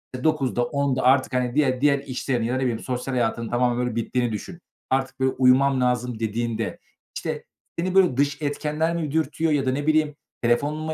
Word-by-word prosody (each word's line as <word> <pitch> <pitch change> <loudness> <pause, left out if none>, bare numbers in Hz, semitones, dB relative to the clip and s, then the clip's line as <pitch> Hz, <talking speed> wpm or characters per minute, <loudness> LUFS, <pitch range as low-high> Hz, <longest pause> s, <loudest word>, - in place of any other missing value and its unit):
E, 125 - -7
21.00'de 135 -6 +1
22.00'de 140 -1 0
artık, 130 0 +3
hani 125 0 0
diğer 130 -4 +2
diğer 140 -1 +4
işlerini 125 -3 -2
ya, 125 - -1
ne 130 - -1
bileyim, 120 -3 0
sosyal 130 +1 -4
hayatının 115 -1 -1
tamamen 120 0 +1
öyle 120 -2 -3
bittiğini 120 0 -1
düşün. 170 - -6 0.3
Artık, 135 0 -1
böyle, 130 0 +2
"Uyumam 130 +1 +4
lazım," 125 -2 0
dediğinde, 115 +1 -2 0.4
işte, - - -4 0.4
seni, 185 +2 -1
böyle, 180 -9 +4
dış 145 +1 +1
etkenler 150 +3 -1
mi 155 -4 -2
dürtüyor 160 +1 0
ya 140 -3 +1
da, 130 - +2
ne 145 +3 -3
bileyim, 155 -1 +2 0.3
telefonunu 145 +6 +1
mu 155 - -2
130 Hz, 190 wpm, -24 LUFS, 125-150 Hz, 0.4 s, diğer